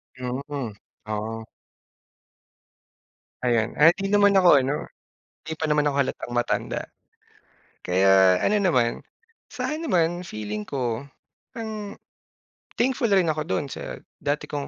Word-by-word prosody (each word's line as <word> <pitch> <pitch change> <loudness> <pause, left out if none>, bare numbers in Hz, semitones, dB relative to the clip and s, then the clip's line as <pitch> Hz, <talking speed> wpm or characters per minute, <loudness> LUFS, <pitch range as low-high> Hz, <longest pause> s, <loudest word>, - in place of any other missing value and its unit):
Yun, 125 +1 -4 0.7
oo. 110 +1 -4 2.0
Ayan, 115 -2 +1
ah, 160 +4 +7
hindi 195 - -1
naman 205 0 +5
ako 185 -2 +6 0.2
ano, 140 +3 -3 0.5
hindi 160 - -5
pa 160 - -6
naman 150 -1 +2
ako 145 - -1
halatang 120 -2 -5
matanda. 120 - -1 1.0
Kaya 95 0 +5
ano 210 0 +3
naman, 130 -12 +2 0.5
sa'kin 315 +2 -4
naman, 175 - +1
feeling 105 0 -5
ko 125 -1 -3 0.5
ang 215 -3 -6 0.8
thankful 255 -1 +1
rin 190 -6 +3
ako 155 0 -4
do'n 145 -6 -2
sa - - -6 0.2
dati 145 +1 -2
kong 145 -2 -3
150 Hz, 120 wpm, -25 LUFS, 115-190 Hz, 2.0 s, ah